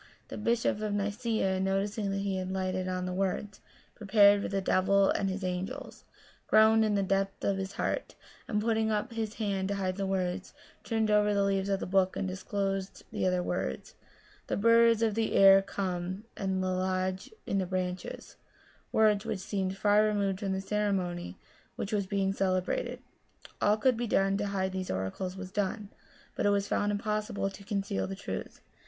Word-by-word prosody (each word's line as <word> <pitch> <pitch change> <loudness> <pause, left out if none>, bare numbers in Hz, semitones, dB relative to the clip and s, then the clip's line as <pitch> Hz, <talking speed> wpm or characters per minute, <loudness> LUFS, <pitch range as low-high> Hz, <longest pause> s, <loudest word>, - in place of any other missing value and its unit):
The - - -6
bishop 230 -1 +1
of 210 -1 -1
Nicaea, 205 -1 0
noticing 200 +2 -1
that 195 0 -1
he 195 -1 -1
had 185 0 -3
lighted 185 -1 -2
on 185 0 -2
the 180 - -3
words, 195 +2 -2 0.2
* - - -31
Prepared 205 -1 +5
for - - -2
the 195 - -1
devil 195 +1 +3
and 195 - 0
his 190 +1 -4
angels,* 185 +1 -5 0.4
groaned 220 +1 +6
in 215 -1 +1
the 200 - +2
depth 195 +1 -1
of 200 -1 +1
his 195 0 -4
heart, - - -2 0.3
and 210 - 0
putting 220 -1 +1
up 215 +3 -1
his 220 -1 -3
hand 195 -3 -1
to 200 - -1
hide 185 -1 -2
the 195 -1 -1
words, 185 0 -2 0.3
turned 220 -1 0
over 210 0 +3
the 200 - +3
leaves 195 0 0
of 195 -1 +1
the - - -3
book, 190 0 +2
and 195 - -1
disclosed 195 +1 -3
the - - 0
other 180 -1 +1
words, 65 - -3 0.3
* - - -29
The - - -1
birds 230 +1 +5
of 220 -2 +2
the 220 +1 0
air 195 0 +8
come, 185 0 -3
and 190 -1 -1
lodge 185 0 -1 0.2
in 195 - 0
the 185 - -1
branches 180 -1 -4 0.3
': - - -31
words 215 -2 +3
which 225 -3 -2
seemed 190 0 -3
far 205 +1 +4
removed 200 -3 0
from 195 -2 -2
the 190 - -2
ceremony 190 - -2 0.4
which 210 - -4
was 200 -2 0
being 195 -1 0
celebrated. 190 - -1 0.6
All 205 - +4
that 215 - -12
could 255 -3 +4
be 240 0 -2
done 195 -1 +2
to 205 0 -1
hide 190 -1 -1
these 185 -1 -4
oracles 95 - -3
was 190 -1 -7
done, 205 +1 -2 0.5
but - - +1
it - - +5
was 200 0 +1
found 205 0 +1
im 205 - 0
possible 210 -2 -2
to 200 - -12
conceal 200 0 -2
the 195 - -5
truth. 195 - -6
195 Hz, 195 wpm, -30 LUFS, 190-210 Hz, 0.6 s, air